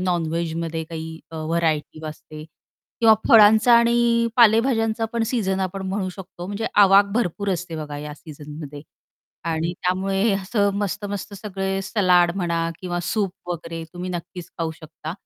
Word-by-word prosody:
नॉन-व्हेजमध्ये 165 Hz, -2 st, -2 dB
काही 160 Hz, 0 st, -7 dB
अ, 165 Hz, -, -8 dB
व्हरायटी 160 Hz, -1 st, -1 dB
असते 155 Hz, 0 st, -9 dB, 0.6 s
किंवा 225 Hz, -1 st, +7 dB
फळांचा 220 Hz, +2 st, +7 dB
आणि 235 Hz, 0 st, +3 dB
पालेभाज्यांचा 225 Hz, -1 st, +4 dB
पण 235 Hz, -1 st, 0 dB
सीझन 195 Hz, -6 st, 0 dB
आपण 190 Hz, +1 st, -3 dB
म्हणू 190 Hz, 0 st, -2 dB
शकतो 185 Hz, -1 st, -9 dB
म्हणजे 205 Hz, +3 st, -3 dB, 0.2 s
आवाक 195 Hz, +1 st, +7 dB
भरपूर 205 Hz, -3 st, -1 dB
असते 175 Hz, -1 st, -4 dB
बघा 150 Hz, -2 st, -6 dB
या 150 Hz, 0 st, -7 dB
सीझनमध्ये. 150 Hz, -1 st, -10 dB, 0.6 s
आणि 165 Hz, +1 st, -1 dB
त्यामुळे 195 Hz, +3 st, +1 dB
असं 200 Hz, +1 st, +1 dB
मस्त-मस्त 205 Hz, +1 st, -3 dB
सगळे 195 Hz, -1 st, -3 dB
सलाड 185 Hz, -3 st, +3 dB
म्हणा 170 Hz, -3 st, -1 dB, 0.2 s
किंवा 175 Hz, -1 st, -3 dB
सूप 205 Hz, -4 st, 0 dB, 0.2 s
वगैरे 165 Hz, -1 st, -5 dB
तुम्ही 180 Hz, +1 st, -5 dB
नक्कीच 175 Hz, 0 st, -7 dB
खाऊ 165 Hz, -1 st, -1 dB
शकता. 155 Hz, 0 st, -8 dB
185 Hz, 140 wpm, -23 LUFS, 165-205 Hz, 0.6 s, किंवा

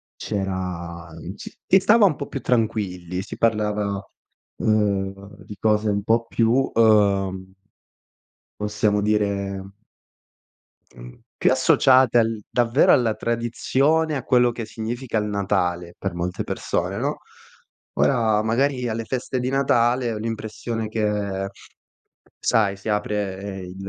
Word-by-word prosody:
c'era 90 Hz, -4 st, -4 dB, 0.3 s
c -, -, -9 dB
si 190 Hz, -, +5 dB
stava 210 Hz, +3 st, +5 dB
un 160 Hz, -7 st, +3 dB
po' 140 Hz, -, -6 dB
più 135 Hz, -, -5 dB
tranquilli. 95 Hz, -7 st, -1 dB
Si -, -, -8 dB
parlava, 105 Hz, -3 st, 0 dB, 0.5 s
ehm, 100 Hz, -1 st, -1 dB
di 105 Hz, -, -9 dB
cose 105 Hz, -1 st, +2 dB
un 100 Hz, -1 st, -1 dB
po' 115 Hz, +2 st, +2 dB
più, 120 Hz, +4 st, +2 dB
uhm 100 Hz, -4 st, +2 dB, 1.1 s
possiamo 105 Hz, 0 st, +1 dB
dire 100 Hz, -2 st, 0 dB, 1.4 s
mhmm, -, -, -12 dB, 0.2 s
più -, -, +3 dB
associate 130 Hz, -2 st, +4 dB
al 115 Hz, -1 st, 0 dB
davvero 120 Hz, +2 st, +3 dB
alla 115 Hz, -3 st, +2 dB
tradizione, 130 Hz, +7 st, 0 dB
a 130 Hz, -, -3 dB
quello 125 Hz, -1 st, +3 dB
che 115 Hz, -1 st, -6 dB
significa 115 Hz, +2 st, -4 dB
il 105 Hz, -, 0 dB
Natale 90 Hz, -4 st, -1 dB
per 95 Hz, -2 st, -4 dB
molte 85 Hz, +1 st, -3 dB
persone, -, -, -2 dB
no. -, -, -2 dB, 0.7 s
Ora 110 Hz, -5 st, +2 dB
magari 125 Hz, +2 st, 0 dB
alle 115 Hz, 0 st, -2 dB
feste 130 Hz, +1 st, -3 dB
di 125 Hz, +1 st, -1 dB
Natale 120 Hz, -3 st, +2 dB
ho 110 Hz, -, -4 dB
l'impressione 110 Hz, 0 st, -4 dB
che, 105 Hz, -3 st, -2 dB, 0.9 s
sai, 100 Hz, -3 st, +2 dB
si 105 Hz, +2 st, -6 dB
apre 100 Hz, -2 st, -2 dB
il 90 Hz, 0 st, -9 dB
105 Hz, 125 wpm, -23 LUFS, 100-120 Hz, 1.4 s, si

